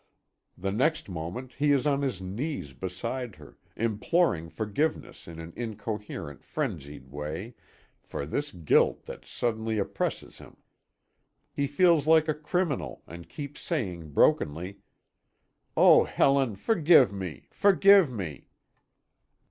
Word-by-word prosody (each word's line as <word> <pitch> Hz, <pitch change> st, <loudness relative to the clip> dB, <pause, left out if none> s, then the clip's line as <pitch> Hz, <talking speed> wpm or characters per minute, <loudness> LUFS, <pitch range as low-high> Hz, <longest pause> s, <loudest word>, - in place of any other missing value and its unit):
The 95 Hz, +2 st, -2 dB
next 145 Hz, +5 st, 0 dB
moment 90 Hz, +10 st, -6 dB
he 145 Hz, 0 st, +3 dB
is 140 Hz, 0 st, +2 dB
on 140 Hz, -1 st, +2 dB
his 130 Hz, -9 st, -2 dB
knees 100 Hz, -, -4 dB
beside 105 Hz, -, -5 dB
her, 75 Hz, -2 st, -16 dB, 0.2 s
imploring 110 Hz, -, +1 dB
forgiveness 110 Hz, -, -3 dB
in 85 Hz, -1 st, -9 dB
an 80 Hz, 0 st, -9 dB
incoherent, 105 Hz, -, -6 dB
frenzied 70 Hz, -1 st, -5 dB
way, 75 Hz, -, -6 dB, 0.5 s
for 70 Hz, -, -6 dB
this 145 Hz, -, -2 dB
guilt 85 Hz, -5 st, +2 dB
that -, -, -10 dB
suddenly 110 Hz, -2 st, -2 dB
oppresses 100 Hz, -, -3 dB
him! -, -, -15 dB, 1.0 s
He 140 Hz, -, 0 dB
feels 155 Hz, 0 st, +3 dB
like 160 Hz, 0 st, +5 dB
a 155 Hz, -, +2 dB
criminal, 160 Hz, +1 st, -2 dB
and 85 Hz, 0 st, -11 dB
keeps 145 Hz, -1 st, -7 dB
saying 90 Hz, -, -3 dB
brokenly: 90 Hz, +10 st, +1 dB, 1.0 s
"Oh -, -, +7 dB
Helen, 135 Hz, -5 st, +2 dB
forgive 155 Hz, -, +4 dB
me! 95 Hz, -6 st, -6 dB
forgive 200 Hz, -5 st, +5 dB
me!" 85 Hz, -, -6 dB
110 Hz, 120 wpm, -28 LUFS, 85-145 Hz, 1.0 s, Oh